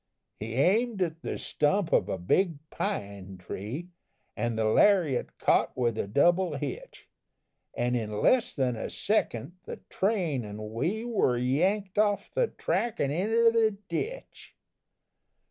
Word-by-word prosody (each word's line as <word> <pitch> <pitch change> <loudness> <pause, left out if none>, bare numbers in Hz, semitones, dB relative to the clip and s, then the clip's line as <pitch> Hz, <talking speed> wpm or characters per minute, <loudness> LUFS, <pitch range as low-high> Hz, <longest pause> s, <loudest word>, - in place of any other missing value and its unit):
"He 110 +2 -5
aimed 205 - +2
at 165 -1 -4
the - - -4
stump 165 +4 0
of - - +3
a - - -1
big 160 - +1
pine 100 -1 -4
tree, 110 - -6 0.5
An' 120 -1 -1
the 110 0 0
lariat 155 - +3
caught - - +2
with 120 -3 +1
a 105 - -2
double 175 - +3
hitch, 140 -2 -7 0.7
An' 120 +1 0
in 105 -3 -2
less 250 -1 +3
than 130 -4 0
a 110 - -4
second 175 - -1
the - - -6 0.2
train 180 - 0
an' 105 +1 -7
we 180 - -1
Were 210 - +1
yanked 185 - 0
off 205 -1 +1
the - - +2
track 235 - -2
an' 140 - +1
inter 225 +8 +3
the 220 -3 +2
ditch! 455 - -5
160 Hz, 145 wpm, -28 LUFS, -, 0.7 s, of